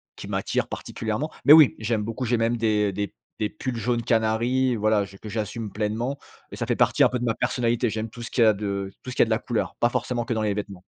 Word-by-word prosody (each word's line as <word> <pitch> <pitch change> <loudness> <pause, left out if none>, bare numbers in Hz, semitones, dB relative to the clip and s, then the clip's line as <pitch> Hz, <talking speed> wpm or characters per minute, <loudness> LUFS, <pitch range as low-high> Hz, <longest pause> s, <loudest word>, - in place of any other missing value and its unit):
qui - - -9
m'attire - - -1
particulièrement. 115 +8 -4
Mais 150 - +10
oui, 155 -4 +8
j'aime 110 -1 -1
beaucoup, 115 +4 -4
j'ai 120 0 +1
même 115 +1 +1
des 105 -2 +1
des 100 0 -3 0.3
des 105 - 0
pulls 120 +3 -4
jaune 120 0 -1
canari, 120 +3 +1
voilà, 110 -1 +2
je 100 0 -14
que 110 - -11
j'assume 110 0 -4
pleinement. 115 +6 -2 0.3
Et - - -7
ça - - -3
fait - - +1
partie - - +2
un - - +5
peu 125 - -1
de 120 - -4
ma 115 - +1
personnalité. 120 0 0
J'aime 110 +1 -3
tout 120 - -11
ce 115 - -6
qui 120 - +1
a 110 -1 +6
de 100 -1 -3
tout - - -7
ce - - -7
qui - - +3
a - - +2
de 110 - -5
la 110 - +2
couleur. 120 -3 -2
Pas 120 - +3
forcément 120 -1 -2
que 120 - -1
dans 110 - -1
les 105 -1 +1
vêtements. 100 -3 -6
115 Hz, 265 wpm, -25 LUFS, 105-120 Hz, 0.3 s, Mais